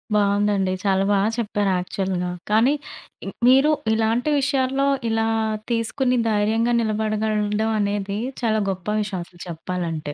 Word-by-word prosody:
బాగుందండి. 205 -1 +2
చాలా 195 -1 +2
బాగా 200 +1 +2
చెప్పారు 205 -3 0
యాక్చువల్‌గా. 180 0 -2 0.2
కానీ, 230 +6 +4 0.5
ఇం - - -4 0.2
మీరు 270 +4 +6 0.2
ఇలాంటి 225 +5 +1
విషయాల్లో 270 0 +1 0.2
ఇలా 225 0 +1 0.4
తీసుకొని, 250 +3 0
ధైర్యంగా 220 +3 +1
నిలబడగలగడం 215 0 0
అనేది 200 0 -1 0.2
చాలా 220 -2 +1
గొప్ప 185 0 -8
విషయం 200 -3 -3
అసల 175 0 -21
చెప్పాలంటే. 165 -3 -4
210 Hz, 120 wpm, -22 LUFS, 195-230 Hz, 0.5 s, మీరు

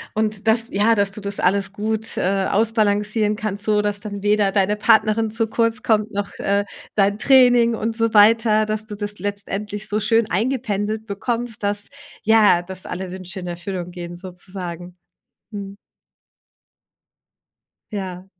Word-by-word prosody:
Und 215 -1 -1
dass 225 +1 +3
ja 210 +3 +3
dass 200 -2 +1
du 210 - -7
das 200 0 -4
alles 195 +2 +1
gut, 220 +1 -3
äh, 195 +1 +1
ausbalancieren 210 0 +1
kannst, 210 -2 -4
so 210 -1 +2
dass 205 -1 -1
dann 205 -1 -7
weder 205 -1 +3
deine 200 +1 +2
Partnerin 220 +1 +3
zu 225 0 0
kurz 230 +2 0
kommt, 215 -2 +1
noch, 200 0 -3
äh, 200 +1 +1 0.3
dein 205 0 +2
Training 245 -3 +5
und 225 +1 -2
so 230 -1 0
weiter, 215 +1 +5
dass 215 +1 -3
du 210 - -6
das 205 0 -5
letztendlich 205 +1 -3
so 210 +1 -1
schön 225 +1 +2
eingependelt 220 -1 -1
bekommst, 230 +2 -3
dass 205 0 -2 0.4
ja, 210 -5 +5
dass 185 +1 -9
alle 185 0 -5
Wünsche 185 0 -7
in 180 - -7
Erfüllung 175 +1 -5
gehen 175 -1 -7
sozusagen. 180 -1 -8 0.5
Mhm. 200 -1 -7 2.1
Ja. 185 -3 -5
210 Hz, 150 wpm, -21 LUFS, 195-220 Hz, 2.1 s, Training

